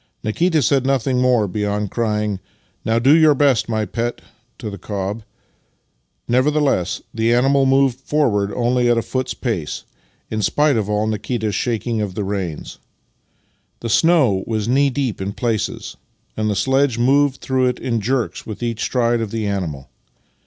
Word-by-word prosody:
Nikita 155 +8 +1
said 135 +2 +2
nothing 130 -1 +1
more 125 -4 +3
beyond 105 +1 -2
crying, 105 -3 -1 0.2
" - - -41
Now 110 +1 +1
do 135 +6 +5
your 155 -2 +5
best, 135 -5 +2
my 110 -1 0
pet! 120 +5 -3 0.2
" 120 +2 -43
to 110 -4 -6
the 100 - -8
cob. 100 +2 -4 1.1
Nevertheless, 130 - +1
the 115 0 +1
animal 135 +3 +3
moved 135 -1 +3
forward 120 -9 0
only 120 0 +2
at 120 - +3
a 115 - +1
foot's 130 -1 -3
pace, 100 - -3 0.5
in 110 -1 -1
spite 145 +7 +2
of 105 -2 -1
all 105 +1 +1
Nikita's 110 0 -2
shaking 115 -1 -1
of 100 -3 -4
the 105 - -2
reins. 95 -5 -4 1.0
The 115 - -4
snow 135 - +3
was 110 -2 -1
knee 140 +3 +3
deep 130 -6 -2
in 100 +1 -3
places, 115 -2 -3 0.4
ancl 110 0 -1
the 105 - 0
sledge 130 +5 +2
moved 135 +3 +3
through 130 -1 +1
it 125 - -1
in 115 -3 -2
jerks 125 +2 -1
with 110 +2 -7
each 115 -2 -2
stride 120 0 +1
of 110 - -3
the 110 0 -3
animal. 85 -9 -3
115 Hz, 165 wpm, -20 LUFS, 105-130 Hz, 1.1 s, do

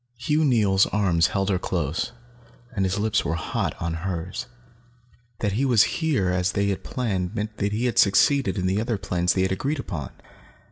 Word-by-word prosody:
Hugh 150 +6 +1
Neils' 105 -8 +3
arms 90 -6 +2
held 95 +1 -1
her 95 - +1
close, 85 -4 -2 0.6
and 95 -2 +1
his 95 +1 -1
lips 105 0 +1
were 80 - -1
hot 85 - -3
on 85 -1 -2
hers. 90 +5 -4 0.9
That 105 - +1
he 115 +8 0
was 120 -5 +5 0.2
here 135 - +1
as 90 0 0
they 100 0 +1
had 100 - -3
planned 100 -6 -2
meant 110 0 -4
that 100 0 -1
he 110 +4 -1
had 120 - +1
succeeded 120 +7 +4
in 90 - -1
the 95 +3 +1
other 115 -1 -1
plans 90 -2 0
they 95 - +1
had 95 - 0
agreed 140 +11 -1
upon. 85 - -5
100 Hz, 190 wpm, -24 LUFS, 90-115 Hz, 0.9 s, was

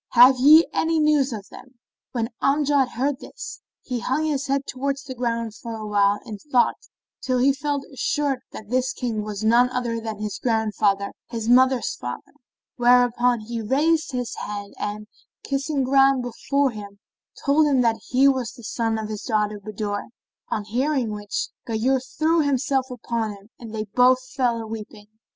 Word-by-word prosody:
Have 250 +2 +7
ye 305 +5 +8
any 325 0 +1
news 300 -3 +3
of 210 -3 -6
them?" 260 0 -14 0.4
When 230 -2 -2
Amjad 285 -1 +3
heard 270 +2 -1
this, - - -9 0.2
he 250 -2 -3
hung 265 +6 -1
his 290 -3 -1
head 275 0 0
towards 275 +1 -3
the 270 -2 -7
ground 230 -3 -2
for 230 0 -7
a 215 -1 -6
while 205 -1 +2
in 210 -3 -7
thought 255 -3 +1 0.3
till 255 -1 0
he 270 +3 +4
felt 285 0 -2
assured 275 0 0
that 215 +1 -10
this 255 0 +1
King 230 -4 -2
was 210 0 -5
none 235 +3 +4
other 240 -2 -2
than 220 -1 -5
his 210 -1 -4
grandfather, 210 -4 +1 0.2
his 230 -2 -4
mother's 255 +1 +4
father; 125 0 -7 0.4
where 245 0 +6
upon 245 -1 +1
he 230 +1 -5
raised 310 +8 +1
his 245 -3 -3
head 205 -1 -6
and, 210 +1 -4 0.4
kissing 275 0 -1
ground 270 0 +4
before 270 +3 0
him, 205 -2 -9 0.5
told 300 +2 +4
him 270 -3 +3
that 230 -2 +1
he 260 +2 +4
was 260 -4 +1
the 240 - -14
son 225 0 -1
of 220 -1 -4
his 210 -1 -5
daughter 210 -2 -1
Budur; 205 0 -4 0.4
on 210 - -2
hearing 250 +2 0
which 205 -1 -3 0.2
Ghayur 240 +4 +1 0.2
threw 320 +2 +3
himself 270 -2 0
upon 235 -3 -3
him 200 +1 -16
and 230 -2 -9
they 215 -1 -3
both 250 +4 +3
fell 245 -3 0
a 225 - -5
weeping. 215 -1 -8
245 Hz, 175 wpm, -23 LUFS, 220-270 Hz, 0.5 s, ye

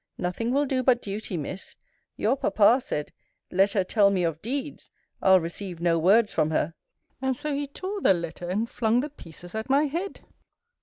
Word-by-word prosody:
Nothing 180 +7 -2
will 285 +3 +2
do 265 -1 0
but 255 -1 +3
duty, 200 -3 -4
Miss! 175 +5 -5 0.4
Your 230 +5 +1
papa 220 0 +4
said, 150 - -4 0.4
Let 195 +2 +3
her 195 - +2
tell 200 +2 +4
me 190 -2 0
of 165 -2 -2
deeds! 275 +5 -4 0.3
I'll 190 -1 +6
receive 175 +1 -6
no 170 -1 +2
words 205 +6 +4
from 155 -1 +2
her. 160 +1 0 0.5
And 265 -1 0
so 300 +2 -3
he 285 0 -2
tore 380 +8 -5
the 190 - +5
letter, 170 +1 -5
and 210 +5 0
flung 235 0 +1
the 295 +1 -5
pieces 175 - -11
at 220 +3 -4
my 280 +3 +4
head. 340 +7 -4
210 Hz, 190 wpm, -26 LUFS, 180-265 Hz, 0.5 s, I'll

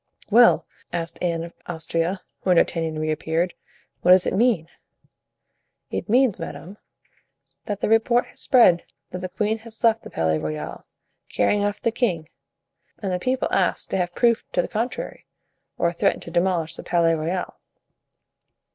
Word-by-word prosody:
"Well," 235 +2 +6 0.3
asked 170 -1 -4
Anne 170 -2 0
of 170 - -9
Austria, 165 +2 -2 0.2
when 185 -2 +3
D'Artagnan 165 -2 +1
reappeared, 160 +3 -1 0.5
"what 180 - +1
does 185 0 +7
it - - 0
mean?" 205 -6 +2 1.2
"It - - -4
means, 245 -4 +3
madame, 175 +4 -8 0.9
that 205 -2 -4
the - - +1
report 225 +2 +3
has - - -11
spread 185 -10 +5 0.3
that 180 - -5
the 185 0 -5
queen 215 +4 -1
has 225 +1 -12
left 225 -1 +4
the - - -10
Palais 80 -1 0
Royal, 75 -1 -5 0.4
carrying 205 0 +1
off 205 0 -1
the 230 - 0
king, 185 -10 -1 0.7
and 195 -3 -3
the 180 - -1
people 255 +6 0
ask - - +1
to - - +1
have 175 -1 -2
proof 235 -2 +3
to - - +2
the - - -4
contrary, 235 +3 -4 0.5
or 170 0 +1
threaten 170 - +1
to 170 - -8
demolish 175 -2 +1
the - - -8
Palais 170 -1 +2
Royal." 165 +3 -3
180 Hz, 155 wpm, -23 LUFS, 165-220 Hz, 1.2 s, does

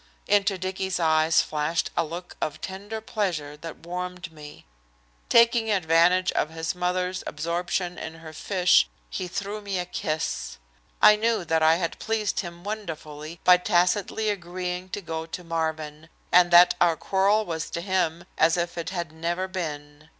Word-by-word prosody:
Into 200 -1 +2
Dicky's 185 0 -3
eyes 160 -1 +4
flashed 155 +2 -1
a 170 - +2
look 170 +3 -7
of 150 - -2
tender 205 +4 -6
pleasure 175 -10 -2
that 165 +1 -9
warmed 180 0 -5
me. 150 -2 -12 0.6
Taking 235 -1 +5
advantage 180 -1 +3
of 150 - 0
his 160 0 -3
mother's 180 +1 -1
absorption 175 +3 -2
in 160 - -6
her 160 -1 -11
fish 180 - +3 0.2
he 185 - -3
threw 200 +3 -4
me 200 -2 -3
a 180 - -2
kiss. 155 - -3 0.5
I 210 - +9
knew 225 -4 0
that 160 0 +1
I 160 +1 +6
had 170 -1 -3
pleased 220 -2 -1
him 175 -2 -6
wonderfully 165 -6 -6
by 180 0 +7
tacitly 180 +5 +1
agreeing 180 -1 -5
to 205 - -4
go 160 -2 -5
to 180 +2 -7
Marvin, 160 -1 -3 0.2
and 175 0 +6
that 175 +1 +8
our 170 -2 +5
quarrel 200 +5 +2
was 160 -3 -4
to - - -4
him 175 -3 -1
as 165 +2 +4
if 170 0 -2
it 170 - -3
had 175 -4 -4
never 170 +3 -2
been. 150 -4 -6
175 Hz, 160 wpm, -25 LUFS, 160-190 Hz, 0.6 s, I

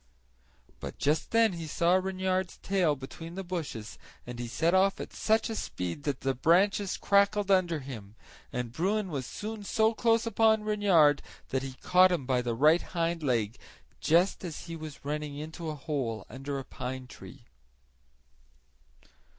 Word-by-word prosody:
But - - -7
just 150 +2 +1
then 225 -3 +4
he 165 -2 -6
saw 170 +3 +2
Reynard's 185 -1 0
tail 180 -6 +1
between 165 +5 -9
the 195 - -4
bushes 160 - -5 0.3
and 120 0 -7
he 120 - -3
set 160 +8 +1
off 190 +1 +3
at - - -7
such 220 0 +2
a 225 - -3
speed 90 - -4
that 145 -4 -2
the 135 0 +1
branches 190 +8 +2
crackled 200 0 +3
under 175 -5 +2
him, 110 -6 -9 0.4
and 125 -2 -3
Bruin 190 - -1
was 135 -4 -3
soon 215 0 -6
so 220 +2 +2
close 230 0 +2
upon 220 -1 +3
Reynard 190 -9 +4 0.3
that 130 - 0
he 135 -1 -6
caught 185 +1 +6
him 170 -7 -1
by 125 -1 +1
the 120 -1 -2
right 155 +7 +5
hind 170 -1 -2
leg 115 -6 0 0.4
just 175 +5 +2
as 170 -4 -6
be 165 - -6
was 155 -3 -9
running 150 0 -3
into 155 +2 -6
a 155 - -4
hole 135 -7 -3
under 135 +3 -4
a 135 - -5
pine 130 0 -6
tree. - - -13
165 Hz, 165 wpm, -29 LUFS, 135-190 Hz, 0.4 s, caught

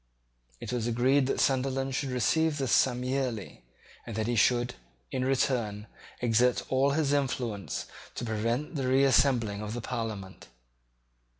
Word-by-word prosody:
It - - -5
was 120 -2 -1
agreed 130 +3 +3
that - - -1
Sunderland 135 0 +1
should 135 +1 -1
receive 145 +6 +1
this 135 -4 -1
sum 125 -1 +3
yearly, 125 -5 -3 0.4
and 115 - -7
that 110 0 -1
he 120 +1 0
should, 120 +2 +3 0.4
in 130 - -1
return, 120 -6 0 0.4
exert 120 +1 +2
all 135 +1 +3
his 145 -2 +1
influence 125 -7 -2 0.3
to - - -4
prevent 115 +7 -1
the 135 -5 -2
reassembling 130 -5 +3
of 105 +1 -5
the 120 - -4
Parliament. 110 -6 -5
125 Hz, 140 wpm, -29 LUFS, 115-135 Hz, 0.4 s, agreed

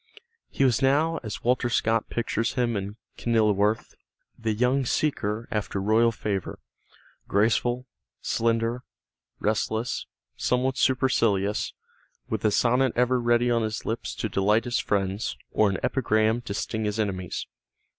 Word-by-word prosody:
He - - 0
was 120 -3 +2
now, 150 +5 +2
as 110 -4 -6
Walter 125 0 +2
Scott 115 -1 +1
pictures 115 -1 -1
him 120 -3 +1
in 100 +1 -4 0.2
"Kenilworth," 110 -2 +1 0.4
the 115 -1 -2
young 125 +5 +2
seeker 115 -5 -1
after 105 -2 -2
royal 110 +4 +3
favor, 100 -4 -3 0.7
graceful, 120 +4 +1 0.3
slender, 115 +1 0 0.6
restless, 110 +2 -1 0.3
somewhat 130 +1 0
supercilious, 115 -6 +1 0.5
with 110 -2 -3
a 110 - +4
sonnet 125 +4 +2
ever 125 +1 +2
ready 120 +1 +3
on 115 -1 +2
his 110 0 -3
lips 115 - -3
to - - -2
delight 105 +3 +2
his 120 -1 0
friends 95 - -1
or 105 -1 +3
an 95 - -1
epigram 110 -2 +2
to 100 - -4
sting 110 0 -2
his 105 +1 -2
enemies. 95 -4 -2
115 Hz, 135 wpm, -26 LUFS, 105-120 Hz, 0.7 s, a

